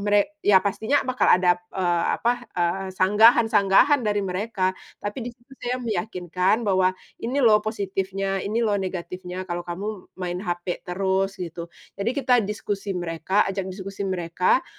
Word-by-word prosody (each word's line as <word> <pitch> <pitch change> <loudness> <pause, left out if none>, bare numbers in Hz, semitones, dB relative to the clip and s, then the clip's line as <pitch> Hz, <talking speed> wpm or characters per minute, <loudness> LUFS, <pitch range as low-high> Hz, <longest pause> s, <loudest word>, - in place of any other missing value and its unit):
mere 205 0 +3 0.2
ya 205 - +5
pastinya 220 +7 +1
bakal 255 0 +1
ada, 180 -1 +2
eee, 175 -2 0
apa, 240 +1 +2 0.2
eee, 180 +2 0
sanggahan-sanggahan 220 +5 +5
dari 205 -1 +1
mereka, 190 0 -1 0.3
tapi 205 +4 -3
di - - -2
situ 240 +3 -24
saya 245 +1 -1
meyakinkan 185 0 0
bahwa, 185 -2 +2 0.2
"Ini 245 +4 -3
loh 215 -2 +6
positifnya, 195 -2 -2
ini 225 +4 -1
loh 205 -2 +1
negatifnya 185 0 -5
kalau 175 -1 -3
kamu 180 +4 -4 0.3
main 180 -1 -3
HP 175 -2 -3
terus." 190 +1 0
Gitu. 170 -1 -6 0.3
Jadi 200 +4 0
kita 250 -3 +3
diskusi 200 -1 -3
mereka, 175 +3 0
ajak 190 -1 -3
diskusi 195 +1 -8
mereka, 180 +5 +1
195 Hz, 145 wpm, -24 LUFS, 180-210 Hz, 0.3 s, loh